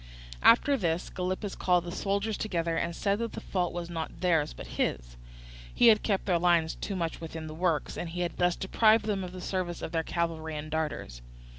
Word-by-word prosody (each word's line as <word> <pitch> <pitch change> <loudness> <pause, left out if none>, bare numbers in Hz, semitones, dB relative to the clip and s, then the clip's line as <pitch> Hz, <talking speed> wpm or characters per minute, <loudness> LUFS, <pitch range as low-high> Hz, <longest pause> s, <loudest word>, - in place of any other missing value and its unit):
After 275 +4 +6
this 170 -4 -1
Gylippus 185 +2 -3
called 180 -2 +2
the 175 - -6
soldiers 200 +3 -1
together, 170 -6 -1
and 170 0 -1
said 200 +2 0
that 230 -1 -3
the - - -5
fault 180 -2 -1
was 175 0 -4
not 165 -2 -5
theirs 165 -5 +2
but - - -9 0.2
his; - - -2 0.6
he 240 - +6
had 215 -1 +5
kept 200 -3 0
their 180 -3 +2
lines 170 -2 +3
too 200 - -5
much 170 -3 -3
within 160 -1 -6
the 155 - -7
works, 165 -2 -1
and 175 - -4
had 175 +1 -3
thus 180 -1 +2
deprived 215 +3 +3
them 200 -3 -1
of 180 - -6
the 185 - -8
services 180 -2 -3
of - - -4
their 165 - +1
cavalry 160 -2 -2
and 155 +1 -6
darters. 150 - -3
175 Hz, 205 wpm, -29 LUFS, 165-195 Hz, 0.6 s, After